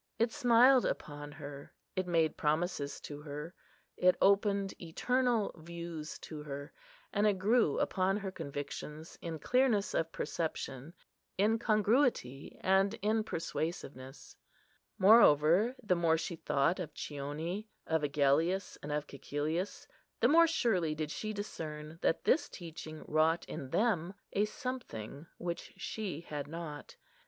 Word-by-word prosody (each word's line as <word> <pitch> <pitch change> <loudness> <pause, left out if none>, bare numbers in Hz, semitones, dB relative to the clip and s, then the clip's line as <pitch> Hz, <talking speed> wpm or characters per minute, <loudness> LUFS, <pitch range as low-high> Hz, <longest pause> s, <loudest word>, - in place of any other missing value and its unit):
It 230 0 +2
smiled 255 -1 +6
upon 145 0 -4
her; 145 -2 -9 0.2
it 185 -1 -1
made 165 -3 +2
promises 150 -2 -1
to 145 0 -7
her; 150 +3 -6 0.4
it 180 0 +4
opened 200 0 +3
eternal 240 +6 +1
views 170 -1 -7
to 155 -2 -7
her; 145 -1 -7 0.4
and 205 +1 +3
it 205 -2 +2
grew 210 - +3
upon 190 +1 +1
her 195 -2 -4
convictions 150 0 -6
in 165 -2 -4
clearness 240 - +2
of 165 0 0
perception, 155 -2 -4 0.4
in 215 +4 +3
congruity, 215 - +1
and 195 +2 +3
in 215 +1 +2
persuasiveness. 155 - -5 0.6
Moreover, 195 - +6
the 185 -4 +2
more 165 -2 +3
she 170 +2 -3
thought 150 +3 +1
of 160 -4 -5
Chione, 155 +8 -4 0.2
of 160 -1 +1
Agellius, 150 +6 +1
and 145 - -5
of 150 0 -1
Cæcilius 150 +7 -3 0.3
the - - +5
more 335 +2 +7
surely 190 - +1
did 155 -1 -3
she 215 +6 -3
discern 160 -6 -6
that - - +1
this 315 - +3
teaching 160 -3 -8
wrought 160 +2 +2
in 135 - -6
them 195 - +1 0.2
a 205 - +3
something 170 - -6
which 170 -1 -5
she 195 -8 -4
had 150 -4 -5
not. 160 -2 -7
170 Hz, 130 wpm, -33 LUFS, 150-205 Hz, 0.6 s, more